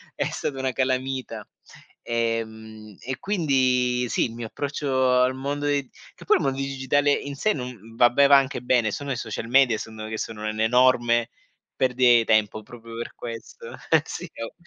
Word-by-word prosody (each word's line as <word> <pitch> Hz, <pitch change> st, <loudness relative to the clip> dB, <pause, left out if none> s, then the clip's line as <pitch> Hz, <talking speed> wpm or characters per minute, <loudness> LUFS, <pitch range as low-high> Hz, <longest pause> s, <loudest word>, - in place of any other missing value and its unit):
è -, -, -1 dB
stata 135 Hz, -2 st, -4 dB
una 130 Hz, -1 st, -1 dB
calamita. 130 Hz, +1 st, -2 dB, 0.6 s
Ehm, 110 Hz, -2 st, -4 dB
e 130 Hz, +1 st, -5 dB
quindi 130 Hz, -9 st, +1 dB
sì, -, -, +1 dB
il 115 Hz, -, -6 dB
mio 115 Hz, -1 st, -6 dB
approccio 130 Hz, -1 st, 0 dB
al 130 Hz, +1 st, +2 dB
mondo 140 Hz, +2 st, -3 dB
dei 140 Hz, -2 st, 0 dB, 0.3 s
che -, -, -14 dB
poi -, -, +4 dB
il -, -, -3 dB
mondo 135 Hz, -1 st, -1 dB
digitale 135 Hz, +1 st, +1 dB
in 140 Hz, 0 st, -3 dB
sé 215 Hz, +9 st, +1 dB
non 120 Hz, -4 st, -8 dB
vabbè 120 Hz, +4 st, +5 dB
va 140 Hz, 0 st, +8 dB
anche 135 Hz, -2 st, 0 dB
bene, 125 Hz, -3 st, +2 dB
sono 140 Hz, +5 st, -4 dB
i -, -, -1 dB
social 115 Hz, -1 st, -5 dB
media, 125 Hz, -2 st, +4 dB
secondo 110 Hz, 0 st, -8 dB
me, -, -, -7 dB
che 110 Hz, -, -4 dB
sono 110 Hz, 0 st, -5 dB
un'enorme 120 Hz, +2 st, +2 dB, 0.5 s
perdita 125 Hz, -1 st, +3 dB
di 115 Hz, -1 st, +3 dB
tempo, 110 Hz, 0 st, +1 dB
proprio 115 Hz, 0 st, -12 dB
per 120 Hz, -, -6 dB
questo. 115 Hz, -1 st, -9 dB, 0.2 s
Eh -, -, +6 dB
sì, -, -, -6 dB, 0.2 s
oh. 115 Hz, -, -7 dB
125 Hz, 180 wpm, -24 LUFS, 115-135 Hz, 0.6 s, va